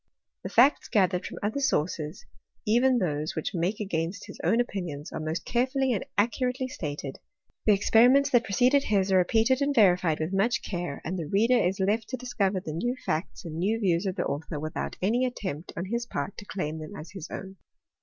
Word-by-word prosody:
The - - -5
facts 265 +5 +4
gathered 185 -4 +1
from - - -8
other 215 +7 -1
sources, 160 - -1 0.4
even 245 +4 +4
those 155 -6 -1
which 160 - -3
make 180 +4 -1
against 185 -1 -3
his 200 - -11
own 230 - +3
opinions, 175 -11 -3
are - - -4
most 160 +2 -3
carefully 260 +1 +1
and 205 - -1
accurately 250 +4 +1
stated: 145 - -5 0.5
the 210 - +7
experiments 250 +7 +5
that 245 -2 +4
preceded 250 +7 +3
his 195 -2 +1
are 190 - +5
repeated 225 +8 +2
and 280 0 +1
verified 180 -6 +4
with 160 +4 -2
much 230 +5 +1
care; 175 -6 -4
and 180 +3 -3
the 160 - -4
reader 220 +9 +3
is 190 +3 0
left 210 +4 0
to 255 - -3
discover 205 -6 -1
the 160 -4 -6
new 240 +10 -1
facts 160 +4 -3
and 160 -1 -5
new 215 +6 +1
views 180 -2 +1
of 185 - -2
the 175 - -1
author, 150 +1 -3
without 155 +1 -4
any 235 +6 +2
attempt 190 - -4
on 170 - -2
his 235 +4 -2
part 145 +2 -4
to 205 - -10
claim 160 -6 -4
them 155 +6 -8
as 155 - -9
his 190 -4 -7
own. 190 0 -7
195 Hz, 200 wpm, -27 LUFS, 170-235 Hz, 0.5 s, the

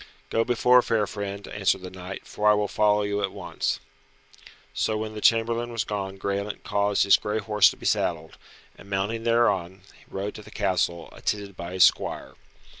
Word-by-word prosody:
"Go 115 - +2
before, 125 +1 +4
fair 110 -3 +1
friend," 100 -1 -6
answered 95 -2 0
the 90 - -7
knight, 95 +1 -8
"for 105 0 +1
I 105 - +6
will 105 0 0
follow 105 0 +2
you 100 0 -1
at 100 -1 -1
once." - - -3 0.9
So 110 - 0
when 110 0 -4
the 105 - -7
chamberlain 115 +1 +2
was 115 -1 -1
gone 95 -3 -4
Graelent 100 +1 -3
caused 100 0 +1
his 100 - +6
grey 105 +1 -2
horse 105 -2 +4
to - - -9
be - - -11
saddled, 80 -2 -1 0.4
and 100 - -15
mounting 105 +4 -2
thereon, 100 -6 +1 0.3
rode 100 +2 -4
to - - -9
the - - -14
castle, 90 -5 -1
attended 100 -2 -3
by 85 +1 -7
his 95 -1 +5
squire. - - +1
105 Hz, 185 wpm, -25 LUFS, 95-110 Hz, 0.9 s, I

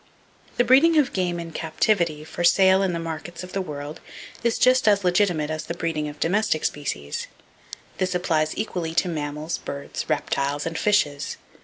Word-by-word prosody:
—The 245 - +5
breeding 275 +7 +5
of 295 -4 +3
game 175 -2 -1
in 165 -1 -6
captivity 160 -1 0
for 165 +2 -5
sale 190 +2 +5
in 190 -2 +1
the 170 - -2
markets 165 +1 -6
of 180 - -10
the 195 - 0
world 150 -3 -6 0.4
is 235 -1 +1
just 255 -1 +4
as 200 -1 +4
legitimate 175 -4 +2
as 155 0 -4
the 170 - -4
breeding 160 -3 -2
of 145 0 -11
domestic 185 -1 +1
species. 75 - -3 0.7
This 185 -1 0
applies 160 -3 0
equally 175 -6 -3
to 175 - +2
mammals, 150 0 -3
birds, 140 +3 -6
reptiles 145 -1 -1
and 165 0 -3
fishes. 160 -8 +1
170 Hz, 170 wpm, -24 LUFS, 155-190 Hz, 0.7 s, The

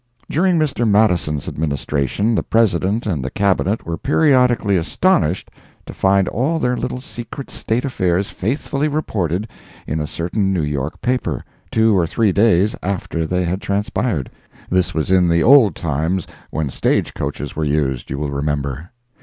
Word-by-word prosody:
During 180 +3 +2
Mr. 135 -7 +1
Madison's 90 -9 +2
Administration 75 - -1
the - - +1
President 105 0 +1
and 80 -11 -1
the 65 - -3
Cabinet 100 +4 0
were 85 0 -4
periodically 125 -8 +3
astonished 90 - +1 0.3
to - - -8
find 95 -1 +2
all 140 +9 0
their 125 -5 0
little 125 - -3
secret 125 +1 -8
state 115 +4 -2
affairs 95 -7 0
faithfully 140 +6 -1
reported 105 - -1 0.4
in 80 - -2
a 75 - -2
certain 95 +6 -1
New 90 -5 0
York 70 -2 -3
paper, 120 - -1 0.2
two 110 -1 +3
or 85 -3 +2
three 110 +3 +2
days 105 0 +3
after 90 -4 -2
they 90 +1 0
had 90 +3 -2
transpired—this 95 - -2
was 80 +3 -1
in 90 -2 +4
the 85 0 +3
old 130 -5 +6
times, 80 +3 -1 0.2
when 75 -4 -2
stage - - 0
coaches 75 - -4
were 80 - -1
used, 70 -4 -1
you 70 - -3
will 75 0 -3
remember. 70 +2 -2
95 Hz, 155 wpm, -19 LUFS, 80-115 Hz, 0.4 s, old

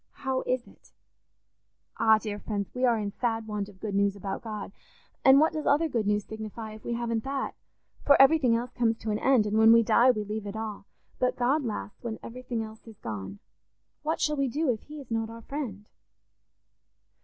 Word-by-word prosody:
How 265 -1 +1
is 255 -1 0
it? - - -21 1.1
"Ah, 220 -1 +6
dear 210 -1 -5
friends, 205 -3 -3
we 255 0 +1
are 235 -2 +3
in 205 -2 -3
sad 225 0 -1
want 210 -2 -3
of 190 -2 -17
good 210 0 -4
news 200 0 +2
about 195 -1 -5
God; 210 -3 -6 0.5
and 265 +1 +8
what 315 +2 +3
does 310 - -3
other 300 +3 +4
good 230 -8 -1
news 210 0 +1
signify 220 0 -7
if 215 - -12
we 235 - -2
haven't 230 -1 -1
that? 270 0 -3 0.5
For 285 - +5
everything 270 -3 +6
else 240 +2 -2
comes 230 -2 +1
to 220 - -3
an 210 - -1
end, 260 -5 +4
and 210 +1 +1
when 220 0 +8
we 230 0 +7
die 240 +3 +5
we 215 -4 +2
leave 210 0 -5
it 200 - -6
all. 215 -2 -5 0.3
But 250 - +1
God 270 +5 +2
lasts 105 - -5
when 225 -2 -4
everything 240 -1 -4
else 220 +1 -11
is 220 -2 -12
gone. 100 -3 -6 0.6
What 315 +2 -1
shall 300 -1 +1
we 275 -1 +1
do 290 +3 +1
if 220 - -4
he 300 0 -10
is 265 -4 -12
not 225 0 -1
our 230 0 -10
friend?" 230 -9 -5
225 Hz, 210 wpm, -28 LUFS, 210-255 Hz, 1.1 s, and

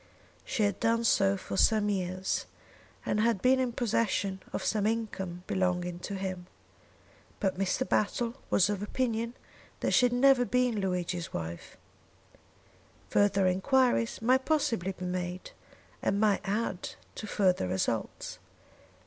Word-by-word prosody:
She 220 - -1
had 205 -2 0
done 230 0 +2
so 195 -3 +3
for 190 - -6
some 215 -1 +4
years 185 -2 -1 0.6
and 210 - 0
had 225 -2 +2
been 260 +5 +4
in 255 -2 0
possession 210 -5 0
of - - -3
some 210 -2 +1
income 195 -6 -3
belonging 180 -2 -1
to 200 +3 -5
him. 185 -2 -4 0.9
But 190 -3 -1
Mr. 195 +7 0
Battle 230 +3 0 0.2
was 190 - +4
of 205 -1 -2
opinion 230 +1 -2 0.5
that - - +1
she 250 - +5
had 245 - -3
never 260 0 +5
been 250 -2 +1
Luigi's 180 -2 -2
wife. 85 0 -6 1.3
Further 200 -1 +3
enquiries 230 +5 +2
might 260 +3 +4
possibly 230 - 0
be 180 0 -7
made, 180 0 -4 0.5
and 200 - +1
might 210 -2 +3
add 205 -2 -2 0.2
to 215 - -7
further 185 - +2
results. 95 +1 -2
205 Hz, 135 wpm, -30 LUFS, 185-230 Hz, 1.3 s, she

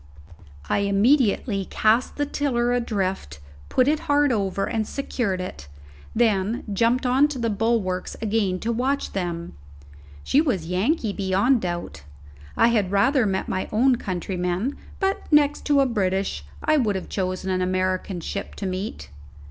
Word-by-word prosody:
I - - +1
immediately 200 0 +2
cast 220 +6 +1
the 290 - 0
tiller 245 -4 0
adrift, 195 - -2 0.3
put 255 - +3
it 300 +1 +2
hard 290 -1 +4
over, 195 -3 0
and 220 -3 -2
secured 235 -8 -2
it, 130 - -7 0.5
then 220 -1 +1
jumped 235 +5 +2
on 260 +4 +4
to 295 -3 -5
the 230 -2 -1
bulwarks 205 -4 -1
again 205 -4 0
to 230 - -1
watch 265 +4 -1
them. 170 - -3 0.7
She 285 - +3
was 225 - -1
Yankee 205 - 0
beyond 200 +6 +2
doubt; 175 - -4 0.6
I 230 - +5
had 210 -5 +1
rather 240 +5 +3
met 190 -1 -1
my 185 - -2
own 245 +3 +3
countrymen; 185 +5 -2 0.2
but, 385 -2 -1
next 295 -1 +3
to 285 -2 +4
a - - +4
British, 195 - -1 0.2
I 310 - +3
would 215 -7 +1
have 190 - -4
chosen 185 0 -2
an 185 0 0
American 185 0 -1
ship 200 +4 -5
to 200 - -5
meet. 190 +3 -4
210 Hz, 150 wpm, -24 LUFS, 185-250 Hz, 0.7 s, I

